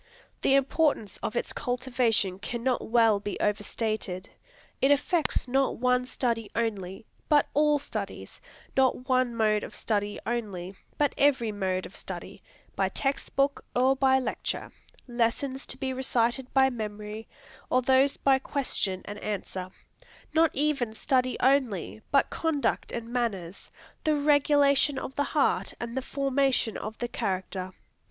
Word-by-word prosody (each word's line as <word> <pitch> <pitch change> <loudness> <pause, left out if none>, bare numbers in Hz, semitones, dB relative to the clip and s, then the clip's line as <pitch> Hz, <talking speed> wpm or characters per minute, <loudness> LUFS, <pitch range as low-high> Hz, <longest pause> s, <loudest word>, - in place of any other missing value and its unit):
The 270 - +4
importance 275 -5 +1
of 215 - -4
its - - -1
cultivation 245 -6 0
cannot 240 +4 -2
well 225 -3 +4
be 205 0 -5
over 210 0 +1
stated. 215 -4 -3 0.5
It 270 - +4
affects 290 +1 +1
not 270 +2 +1
one 250 +1 +2
study 230 -4 -1
only, 205 -3 -2 0.2
but 295 -1 +5
all 300 0 +4
studies; 285 - -6 0.3
not 260 -1 +2
one 255 -2 +2
mode 215 -2 +2
of - - -8
study 205 -2 -1
only, 200 -6 -3 0.2
but 290 -1 +2
every 260 -6 +3
mode 190 -2 -1
of 195 - -11
study, - - -7 0.3
by - - +1
text 275 0 -2
book 275 +1 +1
or 260 +2 +4
by 265 0 +4
lecture; 260 - -3 0.4
lessons 250 +3 -1
to - - -1
be 265 -1 -2
recited 255 0 0
by 265 0 +4
memory, 215 -1 -6 0.4
or 255 0 +3
those 265 +2 +4
by 270 -1 +3
question 230 -9 -1
and 205 0 -7
answer; 190 -3 -4 0.6
not 325 +1 +5
even 275 -6 0
study 255 +1 +1
only, 245 - +1
but 275 - +3
conduct 320 -4 -1
and 235 0 -5
manners, 200 -8 -3 0.3
the 310 -2 +2
regulation 285 -1 +3
of 265 - -5
the 285 - 0
heart 190 -9 +2
and 235 0 -5
the 265 - 0
formation 270 -4 0
of 215 +1 -5
the 240 - -2
character. 190 -4 -3
245 Hz, 145 wpm, -28 LUFS, 215-270 Hz, 0.6 s, but